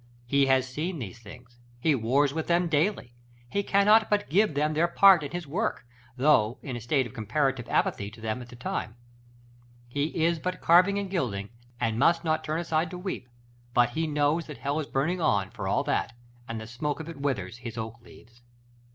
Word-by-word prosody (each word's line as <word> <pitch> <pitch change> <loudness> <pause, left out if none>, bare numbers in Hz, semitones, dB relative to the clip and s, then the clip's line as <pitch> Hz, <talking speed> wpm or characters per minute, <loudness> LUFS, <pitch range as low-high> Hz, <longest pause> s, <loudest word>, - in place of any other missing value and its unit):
He 140 +2 +3
has 130 -1 +3
seen 160 +7 -3
these 120 -4 -7
things; 120 +2 -14 0.2
he 155 +5 +3
wars 135 +3 +2
with 160 0 -3
them 175 0 +2
daily; 155 - 0 0.4
he 200 - +1
cannot 210 +3 +4
but 205 -5 0
give 200 -3 +3
them 150 +2 +1
their 165 +3 +2
part 190 0 +6
in 145 - -5
his 175 +1 -5
work, 180 - -2 0.3
though 125 -5 +3
in 130 - -5
a 120 - -6
state 130 +3 +1
of 120 - -10
comparative 125 +2 -1
apathy 100 0 0
to 115 +2 -15
them 110 +2 -3
at 120 - -11
the - - -11
time. 115 -2 -4 0.9
He 140 +4 -1 0.2
is 170 -1 +1
but 180 +3 -3
carving 185 +4 +5
and 200 -1 -2
gilding, 110 - -2 0.3
and 115 0 0
must 165 +5 +3
not 155 -1 0
turn 155 +1 -2
aside 165 -1 0
to 180 - -7
weep; 180 -9 -5 0.5
but 120 -1 +4
he 160 +5 -1
knows 150 +2 +1
that 150 - -8
hell 140 +2 -2
is 150 - -4
burning 170 +7 -1
on, 100 -9 +1
for - - -5
all - - +1
that, - - -1 0.3
and 115 -1 -4
the 110 - -7
smoke 140 +7 -3
of 160 - -7
it 165 -4 -8
withers 115 -7 -2
his 120 -2 -8
oak 115 +1 -6
leaves. 115 +1 -18
145 Hz, 205 wpm, -27 LUFS, 120-170 Hz, 0.9 s, part